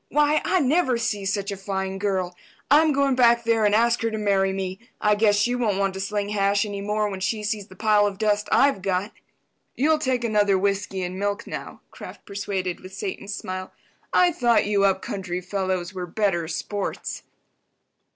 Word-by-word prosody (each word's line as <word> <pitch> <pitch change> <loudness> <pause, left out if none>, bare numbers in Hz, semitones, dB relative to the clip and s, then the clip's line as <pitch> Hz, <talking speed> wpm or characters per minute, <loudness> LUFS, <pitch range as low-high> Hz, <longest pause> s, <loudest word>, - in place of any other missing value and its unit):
Why, 295 +1 +3
I 370 - +2
never 270 -2 +2
see 215 -3 -2
such 200 +1 -1
a - - -3
fine 190 0 -4
girl. 190 -3 -1 0.4
I'm 310 +2 +6
going 280 -1 +2
back 235 -2 +4
there 225 -1 +2
and 205 0 +3
ask 235 +1 +3
her 230 - +1
to 220 - -4
marry 195 -2 +2
me. 190 0 -4 0.2
I 210 - +3
guess 205 0 +3
she 220 +4 +2
won't 230 -6 0
want 195 -1 0
to 190 - -6
sling 205 +1 -2
hash 200 0 +1
any 200 -1 -5
more 210 +1 0
when 195 -2 -5
she 210 +3 -2
sees 210 -1 -3
the - - -14
pile 210 -2 +3
of 200 -1 -5
dust 210 -1 0
I've 275 -8 +4
got." 190 +2 -1 0.6
"You'll 310 +4 +2
take 255 -4 0
another 205 -3 +3
whiskey 195 -1 -1
and 180 +1 -4
milk 205 0 -2
now," - - -7
Kraft - - -11
persuaded, 195 -3 -3
with 185 +1 -11
Satan's 210 - -5
smile. 185 0 -6 0.4
"I 360 -1 +4
thought 240 -7 +2
you 200 -1 +2
up 190 -1 +1
country 185 -3 -4
fellows 185 -1 -2
were 180 -1 -5
better 175 -3 0
sports." 200 +4 -4
205 Hz, 190 wpm, -24 LUFS, 195-225 Hz, 0.6 s, I'm